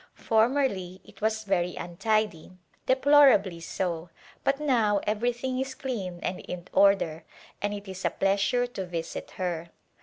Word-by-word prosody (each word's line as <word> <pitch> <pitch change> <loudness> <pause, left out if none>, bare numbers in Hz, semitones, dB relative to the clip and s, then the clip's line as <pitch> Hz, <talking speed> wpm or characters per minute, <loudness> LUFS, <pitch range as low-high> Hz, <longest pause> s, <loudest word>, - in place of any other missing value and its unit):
Formerly 220 -6 +1
it - - -17
was 220 0 0
very 180 -3 0
untidy, 185 -1 -1 0.3
deplorably 260 -9 +5
so, 170 0 -3 0.3
but 275 +1 +1
now 230 -8 +2
everything 240 +4 -1
is 265 0 -3
clean 220 - -4
and 180 - -2
in 180 0 -7
order 195 -5 +3 0.4
and 205 - 0
it 205 0 -6
is 190 0 -7
a - - +3
pleas 195 +1 +1
ure 245 0 +2
to 195 -7 -6
visit 170 -1 -5
her. 175 -2 -3
205 Hz, 145 wpm, -27 LUFS, 180-245 Hz, 0.4 s, deplorably